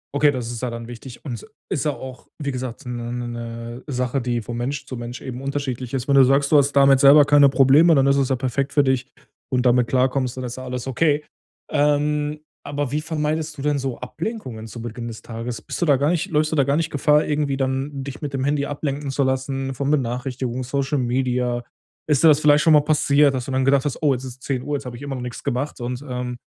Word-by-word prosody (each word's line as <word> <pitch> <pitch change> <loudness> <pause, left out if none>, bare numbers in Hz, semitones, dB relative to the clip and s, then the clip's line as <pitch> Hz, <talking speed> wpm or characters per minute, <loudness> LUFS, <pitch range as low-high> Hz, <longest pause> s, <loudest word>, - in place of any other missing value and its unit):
Okay, 145 0 +4
das 125 -4 -4
ist 120 -2 -5
ja 125 - -1
dann 115 0 -7
wichtig. 120 +3 -10
Und 130 - -4
es 115 - -7 0.2
ist - - -1
ja 150 - +1
auch, 130 -2 -10
wie 140 -1 -2
gesagt, 125 +1 -6
'ne 120 -1 -5
'ne 120 0 -4
'ne 115 +1 -7
Sache, 125 -1 -1
die 120 -1 -1
von 120 +2 -6
Mensch 135 +4 -3
zu 130 - -7
Mensch 120 +1 -6
eben 130 -1 -7
unterschiedlich 135 -3 -4
ist. 130 -1 -2
Wenn 140 - +3
du 135 - +8
sagst, 140 +3 +3
du - - +8
hast 140 0 +3
damit 135 -1 +5
selber 145 +1 +8
keine 145 -1 +6
Probleme, 135 +5 +5
dann 135 -1 +4
ist 140 - +4
es 135 -2 +1
ja 130 - +1
perfekt 130 +2 -1
für 145 - +4
dich 130 -1 0 0.4
und 125 0 +1
damit 125 -1 +3
klarkommst, 130 0 +1
dann 130 - -4
ist 120 0 -5
ja 130 - -8
alles 125 0 -5
okay. 150 +3 +1 0.4
Ähm, 150 +1 +1 0.3
aber 145 -2 -3
wie 150 - 0
vermeidest 155 0 -2
du - - -6
denn 145 0 +1
so 135 -3 -3
Ablenkungen 130 - -6
zu 115 +1 -8
Beginn 115 +1 -6
des 110 - -9
Tages? 115 +1 -6
Bist - - -6
du - - +3
da 145 -4 +4
gar 145 +3 +1
nicht 175 -3 0
läufst 155 0 +1
du - - +1
da 140 - +4
gar 140 +2 +1
nicht 165 -1 -1
Gefahr, 150 +1 +3
irgendwie 145 -2 0
dann 135 +1 -2
dich 140 +1 -8
mit 145 -2 -4
dem 135 -1 -1
Handy 145 0 +1
ablenken 145 -1 -3
zu 140 +1 +1
lassen 135 0 -1
von 140 +2 -1
Benachrichtigungen, 125 -1 -2
Social 140 +3 -1
Media? 125 -1 0 0.5
Ist 145 -1 +3
das 155 -3 +7
vielleicht 150 -1 +4
schon 160 - +4
mal 150 - +7
passiert, 145 -2 +3
dass 130 -2 -3
du - - -5
dann 130 0 +1
gedacht 135 0 +3
hast: 145 - -3
„Oh, 145 -3 +3
jetzt 125 0 -4
ist 130 0 -9
10:00, 140 +2 -2
jetzt 140 - -10
habe 125 -1 -6
ich 120 - -11
immer 140 -1 -4
noch 125 - -5
nix 125 -1 -7
gemacht,“ 130 +2 -3
und 125 +1 -4
ähm, 125 -1 -4
135 Hz, 245 wpm, -22 LUFS, 125-145 Hz, 0.5 s, du